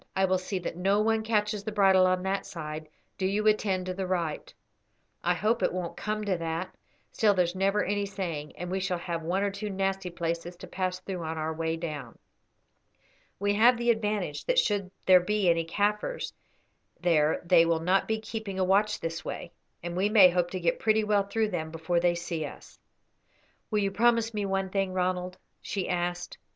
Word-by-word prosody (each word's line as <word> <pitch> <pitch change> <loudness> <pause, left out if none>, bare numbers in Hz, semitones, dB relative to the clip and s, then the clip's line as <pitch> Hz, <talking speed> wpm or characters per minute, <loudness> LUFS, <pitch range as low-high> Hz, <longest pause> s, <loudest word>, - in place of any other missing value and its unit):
I 190 0 +3
will 185 0 +1
see 190 +1 -3
that 175 -2 -4
no 195 +3 +2
one 220 +1 +2
catches 210 -2 0
the 215 - -4
bridle 190 -3 +5
on 185 0 +1
that 195 +1 -1
side; 155 -2 -6 0.3
do 190 - 0
you 205 +2 0
attend 200 -4 +2
to 185 - -3
the 190 0 -3
right. 170 -4 -2 0.7
I 175 +1 +2
hope 215 +7 +1
it - - +2
won't 180 -1 -4
come 215 0 -3
to 190 -3 0
that, 165 +2 -3 0.4
still 210 -4 +3
there's 175 -2 +2
never 195 +2 +1
any 205 +1 -1
saying, 170 -7 -5
and 180 +1 -6
we 190 - 0
shall 185 -2 -1
have 170 -1 -4
one 180 +5 0
or 200 - 0
two 200 +2 -5
nasty 195 -1 -1
places 170 0 -3
to 175 - -10
pass 185 0 -3
through 185 -1 -5
on 160 0 -4
our 155 0 -2
way 160 0 -2
down. 150 -7 -6 1.2
We 205 +1 +1
have 235 +4 +5
the 240 0 +3
advantage 210 -9 -2
that - - +1
should 205 - +2 0.2
there 185 -1 +8
be 205 +1 0
any 165 -1 0
Kaffirs 210 - -1 0.7
there 160 -4 +2
they 170 -1 +6
will 165 -1 +2
not 185 +4 +2
be 220 0 0
keeping 220 -3 -5
a 190 - +2
watch 205 +3 +2
this 165 +1 -4
way, 170 - -6 0.3
and 175 0 -4
we 195 +3 +2
may 200 -4 +7
hope 175 0 +1
to 185 - -4
get 170 -1 0
pretty 220 0 +3
well 205 -2 +2
through 220 +1 0
them 160 -5 -3
before 165 +2 -1
they 175 0 +2
see 170 -2 -3
us." 145 - -10 0.9
"Will 215 - 0
you 200 -1 +1
promise 230 +1 +2
me 205 -2 -1
one 195 0 -1
thing, 195 -1 0
Ronald?" 180 0 -1 0.2
she 195 -3 -3
asked. 175 0 -3
185 Hz, 200 wpm, -28 LUFS, 175-205 Hz, 1.2 s, there